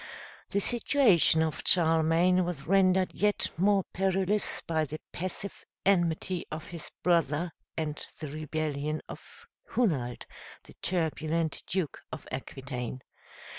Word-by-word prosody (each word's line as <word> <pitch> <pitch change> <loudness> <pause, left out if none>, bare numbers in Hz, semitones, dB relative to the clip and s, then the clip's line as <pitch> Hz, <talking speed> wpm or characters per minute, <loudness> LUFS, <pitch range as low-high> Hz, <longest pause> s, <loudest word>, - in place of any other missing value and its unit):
The 200 - +1
situation 225 - +4
of 155 -4 -2
Charlemagne 165 +2 +4
was 170 -6 -4
rendered 185 0 +3
yet 210 0 +1
more 195 +2 +3
perilous 195 +2 +1
by 160 -1 +1
the 155 +1 -5
passive 185 +2 -4 0.2
enmity 175 -1 +2
of 155 0 -6
his 170 -3 -6
brother, 170 -1 +2 0.3
and 155 -2 -3 0.2
the 155 -3 -5
rebellion 155 0 -3
of 465 - -12 0.3
Hunald, 140 - 0 0.4
the - - -15
turbulent 160 -2 0
Duke 185 -7 -2
of - - -7
Aquitaine. 130 -1 -5
165 Hz, 115 wpm, -29 LUFS, 155-185 Hz, 0.4 s, situation